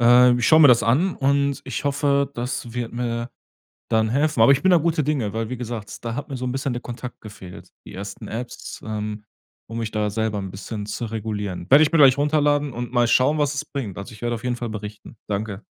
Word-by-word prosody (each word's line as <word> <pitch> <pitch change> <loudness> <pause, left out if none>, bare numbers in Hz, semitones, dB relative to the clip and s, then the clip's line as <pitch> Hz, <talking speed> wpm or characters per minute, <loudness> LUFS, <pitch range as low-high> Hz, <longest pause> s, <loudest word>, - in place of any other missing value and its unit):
Äh, 125 +1 +7
ich 120 - +1
schaue 160 0 +7
mir 145 - +9
das 120 -3 +6
an 145 - +2
und 140 0 +1
ich 130 +1 -5
hoffe, 140 0 +1
das 120 -2 -4
wird 120 -1 -4
mir 120 0 -2 0.6
dann 110 -1 +2
helfen. 145 0 +1
Aber 115 - +7
ich 135 - -1
bin 190 - +5
da 175 - +7
guter 165 -1 +1
Dinge, 135 -8 -1
weil- 110 +1 -3
wie 130 - -4
gesagt- 115 -3 -6
da 115 0 -3
hat 145 - -5
mir 135 - -4
so 125 - -4
'n 125 - -1
bisschen 135 0 -2
der 120 - -4
Kontakt 125 0 -8
gefehlt, 100 -4 -11 0.2
die - - -11
ersten 100 +1 -7
Apps, 120 +2 -7
ähm 105 -1 -4 0.4
um 115 - -6
mich 115 -2 -3
da 105 -1 0
selber 110 0 -1
'n 95 -1 -5
bisschen 105 +2 -6
zu 110 +3 -4
regulieren. 105 -5 -4
Werde 145 +4 +8
ich 150 - +1
mir 165 - +3
gleich 135 -2 +7
runterladen 145 -1 +1
und 120 0 -5
mal 120 -1 +3
schauen, 130 +6 +3
was 145 -1 +1
es 145 +1 -3
bringt. 115 - -5
Also 100 - -8
ich 110 - -12
werde 120 0 0
auf 115 - -5
jeden 125 -1 -1
Fall 120 -1 -5
berichten. 105 0 -8
Danke. 105 0 -3
120 Hz, 240 wpm, -23 LUFS, 110-140 Hz, 0.6 s, mir